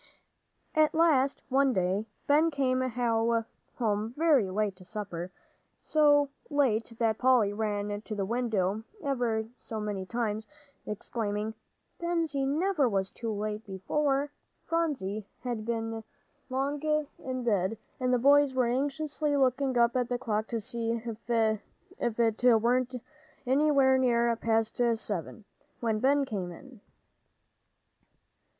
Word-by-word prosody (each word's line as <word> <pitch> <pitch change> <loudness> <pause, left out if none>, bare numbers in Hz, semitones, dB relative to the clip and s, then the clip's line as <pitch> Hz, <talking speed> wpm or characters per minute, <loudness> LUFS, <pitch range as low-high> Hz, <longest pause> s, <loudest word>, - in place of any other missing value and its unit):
At 310 -1 +3
last 285 -5 +3
one 270 0 +3
day, 190 +3 0 0.2
Ben 305 +3 +4
came 260 -4 +1
home 230 -2 -1
very 295 - +4
late 205 0 -1
to 185 - -14
supper, 185 -3 -6 0.5
so 290 -2 +4 0.2
late 245 -7 +1
that 225 -2 +1
Polly 245 -6 +4
ran 205 -1 -2
to 215 0 -6
the 200 -2 -1
window 215 -3 0 0.2
ever 240 -6 0
so 220 -2 -6
many 205 -3 -3
times, 220 0 -2 0.4
exclaiming, 210 0 -3 0.5
"Bensie 330 -5 0
never 305 -1 +2
was 195 -2 -1
so 230 -2 -3
late 210 +1 -3
before." 275 +9 0 0.3
Phronsie 255 - -1 0.2
had 235 -3 -3 0.8
long 275 +3 -1
been 305 0 +1
in 255 -1 -4
bed, 210 -2 +1 0.2
and 255 -1 +1
the 250 - +4
boys 280 +1 +5
were 255 -1 +3
anxiously 290 +4 0
looking 260 -1 +2
up 235 +1 +4
at 250 -2 0
the 245 - 0
clock 220 -3 -2
to 230 - -2
see 230 0 -2
if 230 0 -7
it 225 0 -1 0.2
were 245 +2 +2 0.6
anywhere 270 0 +4
near 235 -2 +3
half 230 -1 -1
past 225 +1 +1
seven, 210 0 -5 0.3
when 225 -2 0
Ben 275 +3 +3
came 190 -7 -4
in. 245 +6 -13
235 Hz, 125 wpm, -29 LUFS, 215-275 Hz, 0.8 s, boys